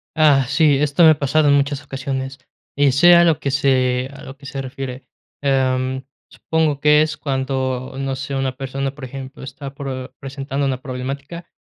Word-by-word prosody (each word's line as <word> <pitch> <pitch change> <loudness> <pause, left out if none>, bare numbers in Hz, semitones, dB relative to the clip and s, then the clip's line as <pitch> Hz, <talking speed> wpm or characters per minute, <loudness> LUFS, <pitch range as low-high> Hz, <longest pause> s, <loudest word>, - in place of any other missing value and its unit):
Ah, 145 -4 +5
sí, 145 0 +3
esto 150 +4 +2
me 160 - +9
ha 150 - +2
pasado 145 +2 +2
en 140 - +5
muchas 140 0 0
ocasiones, 135 -1 -4 0.4
eh, 140 -1 +4
sé 175 +6 +7
a 170 - +7
lo 165 -4 +3
que 140 - -2
sé 130 -2 +1
a 135 - -12
lo 135 +1 -10
que 145 - -16
se 135 -1 -5
refiere. 130 0 -7 0.3
Em, 130 -1 0 0.3
supongo 160 -3 -1
que 150 +1 +5
es 155 0 -1
cuando, 130 -1 -2
no 135 -1 -2
sé, 135 +1 -5
una 135 -1 -1
persona, 135 0 -3
por 140 -2 -9
ejemplo, 135 +1 -9
está 135 +1 -8
pro 130 -2 -6
presentando 135 +1 -3
una 130 -1 -2
problemática, 140 +6 -6
135 Hz, 185 wpm, -20 LUFS, 130-145 Hz, 0.4 s, me